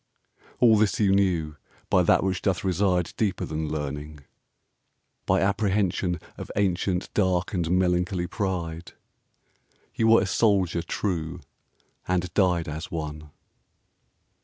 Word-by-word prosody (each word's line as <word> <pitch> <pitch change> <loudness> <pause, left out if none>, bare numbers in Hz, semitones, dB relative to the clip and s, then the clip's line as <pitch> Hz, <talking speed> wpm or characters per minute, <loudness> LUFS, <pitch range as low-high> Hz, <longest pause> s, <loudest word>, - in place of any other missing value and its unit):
All 115 -3 +6
this 105 -1 +1
you 100 -3 +3
knew 85 -6 +1 0.3
by 90 - +3
that 90 - +3
which 95 -1 -1
doth 95 -3 0
reside 90 -2 +1
Deeper 105 -4 0
than 80 0 -3
learning; 75 0 -5 1.1
by - - +3
apprehension 95 -3 0 0.2
Of - - -7
ancient, 95 -2 0
dark, 95 0 +1
and 85 -4 -1
melancholy 90 0 +1
pride 85 -4 -4 1.0
You 110 - +1
were 115 -1 +6
a - - -1
Soldier 95 -4 +2
true, 85 -3 -3 0.7
and 90 -1 -1
died 90 -4 +2
as 80 +2 -5
one. 75 -2 -5
90 Hz, 120 wpm, -26 LUFS, 80-95 Hz, 1.1 s, All